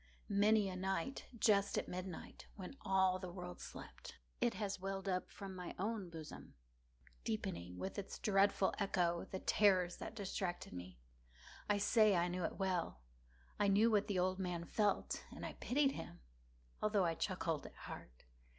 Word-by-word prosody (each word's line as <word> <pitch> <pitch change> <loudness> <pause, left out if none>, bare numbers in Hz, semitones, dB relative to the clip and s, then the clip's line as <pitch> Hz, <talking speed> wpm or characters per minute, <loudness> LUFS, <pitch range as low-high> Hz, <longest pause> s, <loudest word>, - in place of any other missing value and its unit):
Many 205 +1 +4
a 185 - -3
night, 190 +8 -2
just 200 -3 +4
at - - 0
midnight, 180 -1 -6
when 190 +5 -7
all 190 -1 +3
the 185 -1 -5
world 180 0 -7
slept, - - -9 0.2
it 240 -1 +2
has 200 -3 -2
welled 195 +1 -3
up 185 -1 0
from 195 -2 -7
my 180 -1 -6
own 205 -1 -2
bosom, 160 -2 -9 0.7
deepening, 85 +6 -3
with 195 - -3
its 200 - -6
dreadful 195 -2 +3
echo, 175 -4 +1
the 190 - -3
terrors 185 -3 +4
that - - -6
distracted 190 - -3
me. 90 -2 -7 0.7
I 205 - +4
say 210 0 +5
I 175 0 +2
knew 180 0 -2
it - - -3
well. 185 - -1 0.6
I 205 - +4
knew 210 +4 +5
what 205 -1 +3
the 200 -3 0
old 185 +1 +2
man 175 -2 -2
felt, 205 +2 +1
and - - -6
pitied 275 +1 +3
him, 85 - -7 0.6
although 210 -3 +3
I 165 - +2
chuckled 165 -4 -1
at - - -14
heart. - - -9
190 Hz, 160 wpm, -38 LUFS, 180-205 Hz, 0.7 s, say